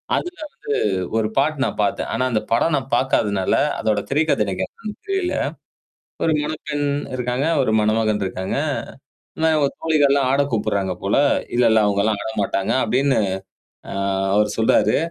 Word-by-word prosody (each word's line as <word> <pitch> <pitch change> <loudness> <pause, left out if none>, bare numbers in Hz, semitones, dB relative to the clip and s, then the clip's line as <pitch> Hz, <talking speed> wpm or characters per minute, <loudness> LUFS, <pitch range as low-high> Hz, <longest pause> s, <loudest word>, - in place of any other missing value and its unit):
அதுல 355 +1 -3 0.5
வந்து 95 -1 -1 0.2
ஒரு 110 -1 +1
பாட்டு 145 0 +1
நான் - - -3
பாத்தேன். - - -1
ஆனா, 130 +3 0
அந்த 110 -1 +1
படம் 150 +7 +2
நான் 135 -1 -4
பாக்காதனால, 100 -7 +1 0.3
அதோட 105 -2 0
திரை 150 +3 +2
கதை 105 - +2
எனக்கு 95 -1 -2
என்னன்னு 210 -2 -9
புரில 385 -2 0 0.9
ஒரு 160 - +3
முறைப்பெண் 150 -1 -3 0.3
இருக்காங்க. 125 +3 -1
ஒரு 110 - +1
மணமகன் 110 -1 +1
இருக்காங்க. 95 +4 -3 0.8
ஆனா, 160 0 +2
அவுங்க 140 -2 +2
தோழிகள்லாம் 140 -4 +3
ஆட 140 - +3
கூப்புட்றாங்க 100 -4 0
போல. 100 - +1 0.4
"இல்ல, 125 - +3
இல்ல 110 -1 +5
அவுங்கள்லாம் 100 +1 +1
ஆட 110 - -4
மாட்டாங்க" 95 0 -1
அப்பிடின்னு. 135 -2 +2 0.7
ஆ, - - -4 0.4
அவர் 105 0 +3
சொல்றாரு. 110 - +3
120 Hz, 150 wpm, -21 LUFS, 105-145 Hz, 0.9 s, இல்ல